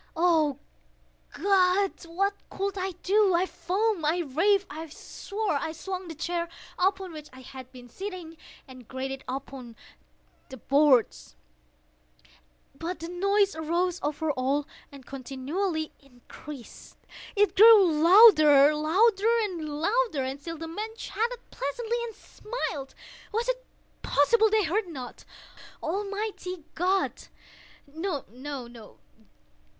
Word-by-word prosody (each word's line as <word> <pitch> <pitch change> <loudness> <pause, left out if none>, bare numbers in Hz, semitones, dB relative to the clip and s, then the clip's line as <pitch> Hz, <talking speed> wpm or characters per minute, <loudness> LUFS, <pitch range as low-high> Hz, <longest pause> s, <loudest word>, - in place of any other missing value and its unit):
Oh 320 -5 +3 0.7
God! 390 0 +3 0.2
what 395 +4 0 0.2
could 395 0 -3
I 380 -1 -3
do? 395 -1 +4
I 355 +2 +2
foamed—I 355 -2 0
raved—I 325 +1 0
swore! 405 +7 -5
I 315 - -3
swung 370 +2 -6
the 325 - -7
chair 340 +2 -3 0.3
upon 380 0 +1
which 305 -1 -9
I 260 - -13
had 260 0 -11
been 250 -1 -13
sitting, 365 - -7 0.3
and 255 -3 -13
grated 265 +1 -4
it - - -22
upon 260 -2 -7 0.7
the 265 - -9
boards, 270 - +2 1.4
but 330 +6 -5
the 330 +1 -7
noise 395 +2 +1
arose 340 +3 -1
over 300 +1 -1
all 275 +2 0 0.3
and 275 -2 -13
continually 290 +6 -3
increased. 275 0 -12 0.4
It 415 0 +3
grew 435 -1 +9
louder—louder—louder! 340 - +4
And 265 +2 -5
still 330 +2 -6
the 325 +1 -6
men 425 +7 -5
chatted 470 +2 -3
pleasantly, 470 - -3
and 455 -3 -8
smiled. 300 - -6 0.4
Was 455 +2 -1
it - - -1 0.4
possible 440 +10 +3
they 435 0 +3
heard 380 +4 0
not? 260 -7 -9 0.6
Almighty 395 -1 -4
God!—no, 350 -3 -4
no! 245 -4 -9
340 Hz, 110 wpm, -27 LUFS, 285-400 Hz, 1.4 s, grew